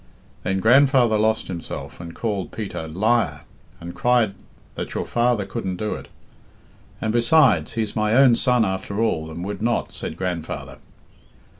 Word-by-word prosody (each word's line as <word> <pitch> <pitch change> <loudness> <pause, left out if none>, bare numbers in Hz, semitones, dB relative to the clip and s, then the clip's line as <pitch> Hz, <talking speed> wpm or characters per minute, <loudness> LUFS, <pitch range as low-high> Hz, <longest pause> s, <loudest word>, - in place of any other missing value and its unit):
Then 95 +1 -1
grandfather 130 -1 +5
lost 110 +1 +1
himself, 85 -3 -7
and 85 -1 -8
called 100 -5 -3
Peter 95 -7 -5
'Liar,' 95 -3 +1 0.4
and 85 +1 -8
cried 120 -5 +2 0.4
that - - -6
your - - -2
father 120 -3 +1
couldn't 95 -3 -4
do 105 +4 -2
it. - - -8 0.9
'And, 110 0 -1
besides, 120 - +4
he's 110 -3 -2
my 110 +1 +1
own 130 -2 +6
son 125 -2 +2
after 95 +2 -3
all, 80 -9 0
and 85 +2 -6
would 105 +2 -5
not,' 120 +1 0
said 80 - -6
grandfather. 90 -3 -4
110 Hz, 150 wpm, -22 LUFS, 95-120 Hz, 0.9 s, own